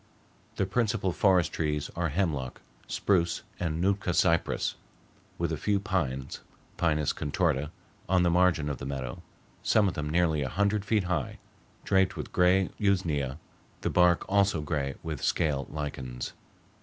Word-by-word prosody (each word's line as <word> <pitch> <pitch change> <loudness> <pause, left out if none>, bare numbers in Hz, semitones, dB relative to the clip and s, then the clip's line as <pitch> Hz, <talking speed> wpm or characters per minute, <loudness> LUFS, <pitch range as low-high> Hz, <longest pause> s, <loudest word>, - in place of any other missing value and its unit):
The 95 - +1
principal 105 -2 0
forest 95 -3 +3
trees 75 -2 -1
are 85 -1 0
hemlock, 75 -6 -1 0.3
spruce, 85 0 +1 0.2
and 80 -2 -1
Nootka 95 -1 +1
cypress, 85 -2 +2 0.6
with 85 -1 -1
a 80 - -1
few 100 +5 +1
pines 80 - -2 0.4
(P. - - 0
contorta) 75 -1 0 0.4
on 90 -1 +4
the 85 - +3
margin 90 -4 +3
of 70 - -3
the - - -6
meadow, 65 -3 -5 0.4
some 105 -2 +3
of 95 - -1
them 75 0 -3
nearly 80 -2 +2
a 65 - -1
hundred 100 +5 +1
feet 105 -1 +2
high, 90 -5 -2 0.5
draped 95 -1 +2
with - - -6
gray 90 +1 +3
usnea, 80 -9 +1 0.4
the - - -1
bark 90 -1 +4
also 100 -3 +3
gray 70 -3 -2
with 80 -4 -4
scale 70 -4 0
lichens. 65 -5 -5
85 Hz, 145 wpm, -28 LUFS, 75-95 Hz, 0.6 s, on